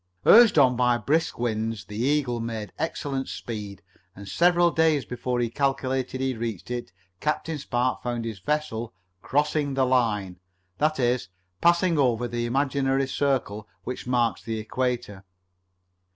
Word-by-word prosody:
Urged 230 -5 +8
on 130 -3 +5
by 125 0 +3
brisk 150 +8 0
winds 110 -2 -2
the 105 - -9
Eagle 125 0 +1
made 115 -3 -5
excellent 140 -4 -3
speed, 105 -5 -6 0.3
and 100 +1 -10
several 175 - +3
days 160 -4 +2
before 125 0 -3
he 120 - +1
calculated 130 0 -1
he 130 0 0
would 115 - -9
reach 115 -1 -4
it 120 -7 -4 0.3
Captain 155 +1 -2
Spark 125 -2 -1
found 120 -1 -3
his 110 -3 -5
vessel 120 -1 -2 0.3
"crossing 145 0 0
the 135 -1 +3
line"; 105 -8 0 0.4
that 155 -1 +1
is, 120 -5 +1 0.3
passing 170 -1 +3
over 120 -3 +2
the 120 0 -2
imaginary 135 +1 +1
circle 130 -7 -1 0.2
which 125 0 -6
marks 120 -3 +1
the 115 -1 -4
equator. 120 -3 -3
125 Hz, 145 wpm, -25 LUFS, 115-140 Hz, 0.4 s, Urged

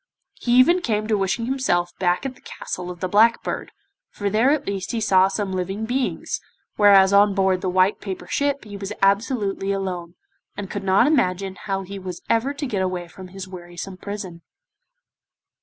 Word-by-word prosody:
He 240 - -1
even 335 +9 +6
came 215 -7 -1
to 215 0 +1
wishing 195 +3 0
himself 230 -10 0
back 180 +5 +1
at 270 - -3
the 270 - -22
Castle 180 0 -6
of 175 -1 -8
the 185 - 0
Black 220 +5 +4
Bird, - - -4 0.4
for 200 -1 -3
there 225 +6 +3
at 290 0 +1
least 195 +1 -3
he 230 - 0
saw 190 -3 +4
some 195 0 -2
living 190 +4 -2
beings, 250 +3 -2 0.3
whereas 200 -2 +6
on 200 0 +5
board 190 -2 +2
the 185 - -1
white 185 +2 +2
paper 190 -2 -6
ship 280 0 -1
he 205 -1 -9
was 195 0 -6
absolutely 200 -1 +1
alone, 180 -3 -4 0.4
and 200 -2 -5
could 205 - -4
not 195 +4 +4
imagine 195 - +1
how 195 -1 -2
he 195 +1 -7
was 180 -2 -7
ever 230 +5 +2
to 285 +1 -4
get 210 -7 -2
away 180 -2 -2
from 185 +3 -11
his 190 +1 -8
wearisome 180 +1 -8
prison. 190 -3 -7
195 Hz, 190 wpm, -23 LUFS, 185-220 Hz, 0.4 s, even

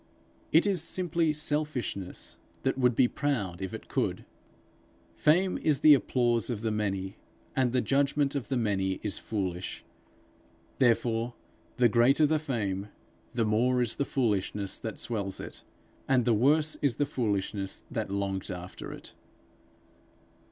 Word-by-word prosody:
It 160 +5 +5
is 195 -5 +2
simply 170 -2 +1
selfishness 150 -10 -2 0.2
that 135 - +1
would 125 -2 +2
be 125 - +5
proud 110 - -2
if 95 - -3
it - - -8
could. - - -1 0.9
Fame 180 +5 +2
is 150 -3 +1
the 155 - +9
applause 120 -4 +2
of 115 -4 -3
the 110 -1 -1
many, 95 -3 -2 0.4
and 130 -2 +2
the 125 0 +2
judgment 140 +1 +1
of 140 -4 -3
the 135 - 0
many 95 -4 0
is 105 - -2
foolish; 95 -4 -4 0.9
therefore 120 -1 +2 0.4
the 125 - +5
greater 120 +7 +4
the 155 +1 +2
fame, 105 -9 -2 0.5
the 115 -2 +1
more 120 +4 +2
is 120 -2 0
the - - +1
foolishness 105 -7 -1
that 110 -3 -5
swells 100 -5 -2
it, - - -8 0.4
and 130 -3 +3
the 120 - +4
worse 150 +7 +3
is 140 -5 +2
the 145 - +1
foolishness 100 -6 -2
that - - -2
longs 100 -1 -2
after 90 -1 -7
it. - - -10
120 Hz, 145 wpm, -29 LUFS, 100-140 Hz, 0.9 s, the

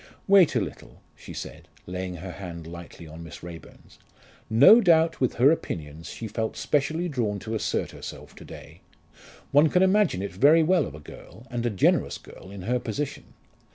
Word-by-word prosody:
"Wait 195 -4 +5
a - - +4
little," - - -7 0.2
she - - -12
said, - - -8 0.2
laying 90 0 -5
her 90 +2 -7
hand 85 -4 -8
lightly 85 0 -10
on 80 +1 -11
Miss 80 0 -11
Raeburn's. 85 -1 -12 0.5
"No 140 - +8
doubt 165 -5 +3
with 130 - +1
her 135 +5 +5
opinions 80 - -4
she 115 - -6
felt 110 +1 -3
specially 160 +4 0
drawn 115 -9 -2
to 110 +2 -6
assert 110 - -2
herself - - -10
to - - -11
day. - - -12 0.7
One 145 +3 +5
can 180 +4 +3
imagine 190 - +2
it 100 - -4
very 150 - +5
well 180 - +2
of 75 - -10
a - - -10
girl, 105 +9 -13
and 120 -1 -1
a - - +1
generous 100 -4 +1
girl 95 - -14
in 100 -2 -9
her 125 +5 0
position. 120 +5 -5
110 Hz, 185 wpm, -26 LUFS, -, 0.7 s, No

